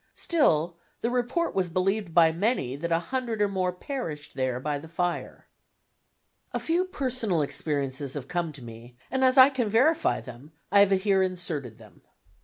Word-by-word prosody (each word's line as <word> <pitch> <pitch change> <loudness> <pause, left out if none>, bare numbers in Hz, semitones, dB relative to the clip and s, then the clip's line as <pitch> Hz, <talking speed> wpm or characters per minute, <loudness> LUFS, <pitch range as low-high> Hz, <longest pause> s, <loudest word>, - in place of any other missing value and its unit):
Still 170 - +1 0.2
the 235 - 0
report 250 +8 0
was 185 -2 0
believed 190 +2 0
by 165 -1 +5
many 170 - 0
that 170 +4 -4
a 165 - +4 0.2
hundred 245 -4 -1
or 205 - +3
more 185 -2 -1
perished 180 - -6
there 130 -1 -1
by 145 +2 -2
the 160 - -11
fire. 175 +1 -3 1.1
A - - -1
few 345 +3 +1
personal 250 - -1
experiences 140 -2 -3
have 135 -3 -5
come 175 -1 -2
to 135 -4 -10
me, 120 +1 -12
and 265 0 +1
as 260 +1 +4
I 260 +2 +9
can 245 -5 -1
verify 305 +10 +3
them, 125 +6 -12 0.2
I 200 - +6
have 200 -1 +6
here 195 0 +2
inserted 170 - -3
them. - - -17
180 Hz, 175 wpm, -27 LUFS, 150-235 Hz, 1.1 s, I